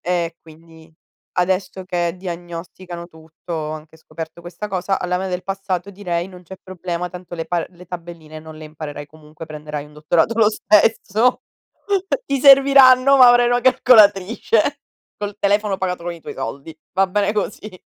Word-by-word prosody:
E 170 -2 -2
quindi 160 0 -17 0.4
adesso 185 +1 -1
che 175 -2 -1
diagnosticano 175 0 -8
tutto 160 +1 -12
ho 155 -2 -3
anche 155 +1 -10
scoperto 160 +1 -9
questa 175 +4 -7
cosa. 190 0 -1
Alla 180 0 -1
me 190 +1 -3
del 180 0 -3
passato 195 -1 -4
direi: 180 -3 -3
"Non 180 -1 -14
c'è 190 - -10
problema, 180 -1 -5
tanto 180 -1 -10
le 165 -1 -4
pa 170 0 -1
le 180 0 -16
tabelline 165 -3 -9
non 155 0 -12
le 155 - -10
imparerai 150 -1 -8
comunque, 155 +1 -13
prenderai 150 -1 -7
un 150 - -18
dottorato 160 +8 +1
lo 215 - +6
stesso. 215 +2 +2 0.8
Ti 275 - 0
serviranno, 275 -1 +7
ma 255 -2 +8
avrai 245 0 +5
una 245 0 +2
calcolatrice 230 +2 +3 0.3
col 205 0 -5
telefono 205 0 +1
pagato 180 -2 -3
con 175 - -3
i 170 - -12
tuoi - - -8
soldi." 140 +7 -7 0.2
Va 195 0 +2
bene 205 +1 0
così. 210 -2 -5
180 Hz, 165 wpm, -20 LUFS, 165-205 Hz, 0.8 s, ma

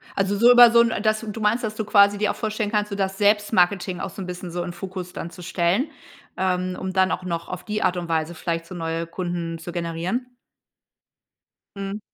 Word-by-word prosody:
Also 200 0 0
so 235 +3 +7
über 245 -1 +9
so 235 0 +7
'n 230 -1 +2
dass 215 +1 +1
du 215 +1 -5
meinst, 220 +4 +2
dass 215 -1 -3
du 220 -1 -3
quasi 205 -1 +5
dir 210 - +1
auch - - -7
vorstellen 215 -1 -2
kannst, 210 -1 0
so 200 - -4
das 195 -1 -2
Selbstmarketing 200 -3 +2
auch 190 - -4
so 195 - -8
'n - - -4
bisschen 180 0 -6
so 175 +1 -3
in 175 - -6
Fokus 180 0 -7
dann 170 - -5
zu 180 - -11
stellen, 175 - 0 0.5
ähm, 185 -1 -1
und 190 0 -5
dann 185 0 +4
auch 180 - -2
noch 170 -2 -3
auf - - -6
die 210 -1 -2
Art 180 0 +1
und 170 -1 -4
Weise 160 +1 0
vielleicht 165 0 -3
so 185 - -9
neue 165 0 -3
Kunden 170 -1 -4
zu 175 +1 -7
generieren? 175 +8 -3 1.5
Mhm. 195 +1 -4
190 Hz, 225 wpm, -23 LUFS, 175-210 Hz, 1.5 s, über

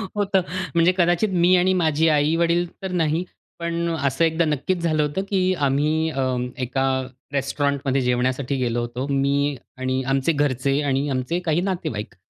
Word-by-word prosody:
होतं. 200 -2 +2 0.3
म्हणजे 170 +2 +5
कदाचित 175 +4 +2
मी 185 +1 +6
आणि 185 +1 +3
माझे 160 -2 +2
आई-वडील 165 +3 +2 0.2
तर 190 - -3
नाही. 165 0 +1 0.4
पण 170 0 -2
असं 140 +2 +1
एकदा 165 +1 +1
नक्कीच 155 +5 -1
झालं 155 -2 +1
होतं, 150 +7 -2
की 185 -2 +2
आम्ही 155 +4 +1
अ, 135 - -2 0.4
एका 130 +1 -1 0.5
रेस्टॉरंट 140 +1 0
मध्ये 135 0 +1
जेवण्यासाठी 125 +2 0
गेलो 120 -2 -1
होतो. 120 +3 -4
मी 140 +1 +1 0.2
आणि 130 0 -1
आमचे 135 +4 +2
घरचे 140 -1 +1
आणि 140 0 0
आमचे 130 +6 -1
काही 160 +1 +1
नातेवाईक 160 - -3
150 Hz, 155 wpm, -22 LUFS, 135-170 Hz, 0.5 s, मी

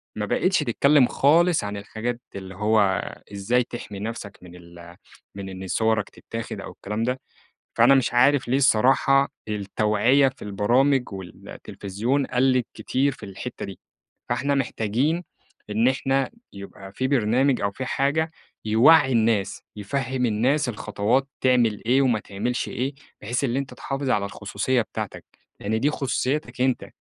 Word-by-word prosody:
ما 105 - -2
بقتش 185 - +1
تتكلّم 140 +3 +4
خالص 165 +6 +3
عن 100 0 -4
الحاجات 115 +4 -4
اللي 95 -1 -8
هو، 110 +2 +2 0.5
إزاي 115 +6 +1
تحمي 115 -4 -8
نفْسك 105 -2 -6
من 90 -1 -13
ال 85 0 -14 0.4
من 100 -1 -6
إن 95 0 -7
صوَرك 110 +1 +1
تتاخد 115 0 -7
أو - - -8
الكلام 105 +3 -4
ده، 125 +2 -1 0.6
فأنا 120 +4 +6
مش 130 -3 +2
عارف 130 0 +4
ليه 130 - +2
الصراحة 135 +2 +4 0.2
التوعية 105 +6 +2
في 130 - -11
البرامج 120 +5 +1
والتلفزيون 100 +6 -4
قَلِّت 130 -1 +2
كتير 140 +2 0
في 120 - -10
الحتّة 100 +6 -7
دي، 95 - -10 0.5
فإحنا 140 +1 +1
محتاجين 135 - 0 0.5
إن 110 +4 +3
إحنا 135 +1 0 0.2
يبقى 100 0 -10
في 130 +5 -1
برنامج 130 +1 +2
أو 100 - 0
في 130 - -5
حاجة، 150 +5 0 0.3
يوعّي 130 +6 +5
الناس 110 -4 +1
يفهّم 125 +4 -2
الناس 125 +6 +1
الخطوات 110 +4 0
تعمل 120 -5 +2
إيه 130 +3 +4
وما 120 -5 +2
تعملش 120 +5 -3
إيه، 135 +3 -3 0.3
بحيث 120 +6 -2
إن 125 -2 0
أنت 135 -2 -3
تحافظ 135 +1 -3
على 100 -1 +2
الخصوصية 105 +5 -1
بتاعتك، 100 - -6 0.4
لإن 110 +2 -1
دي 145 - +2
خصوصيتك 135 -2 -2
أنت، 130 -1 0
120 Hz, 145 wpm, -24 LUFS, 105-135 Hz, 0.6 s, فأنا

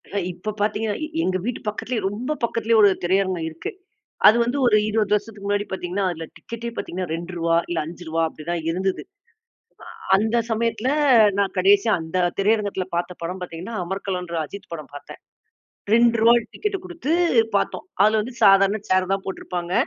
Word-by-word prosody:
அ - - +1 0.2
இப்ப 215 +4 -5
பாத்தீங்கன்னா, 210 0 0
எ - - -6 0.2
எங்க 185 0 +1
வீட்டு 245 0 -2
பக்கத்துலயே, 220 +2 -2
ரொம்ப 230 +8 -4
பக்கத்திலேயே 230 -1 +1
1 205 - +7
திரையரங்கம் 185 -2 +1
இருக்கு. 375 - -6 0.6
அது 215 - +8
வந்து 240 +4 -2
ஒரு 215 -3 +5
20 215 -1 +1
வருஷத்துக்கு 210 -1 -2
முன்னாடி 205 0 0
பாத்தீங்கன்னா, 190 +1 -2
அதுல 165 -1 -6
டிக்கெட்டே 235 0 -7
பாத்தீங்கன்னா 185 +1 -4
ரூ.2 170 -1 -1
இல்ல 170 -2 -1
ரூ.5 165 0 -3
அப்படிதான் 165 +2 -5
இருந்தது. 185 +3 -1 1.0
அ - - -14
அந்த 220 +3 +1
சமயத்துல 230 +2 0 0.5
நான் 200 0 0
கடைசியா, 200 +4 +4
அந்த 160 +3 -4 0.2
திரையரங்கத்துல 200 -2 +1
பாத்த 175 +1 -2
படம் 180 +2 -4
பாத்தீங்கன்னா, 180 +6 -7
அமர்களம்ன்ற 180 -2 -4
அஜித் 200 +5 -11
படம் 155 -4 -8
பாத்தேன். 145 - -11 0.7
ரூ.2 235 0 +5 0.2
டிக்கெட்டு 405 -2 -2
குடுத்து 340 -5 -3 0.4
பாத்தோம். 195 - -2 0.2
அதுல 215 +1 +4
வந்து 245 +3 -8
சாதாரண 195 +1 +5
சேர் 185 0 +2
தான் 195 - -5
போட்டிருப்பாங்க. 180 -2 -5
195 Hz, 155 wpm, -23 LUFS, 180-220 Hz, 1.0 s, அது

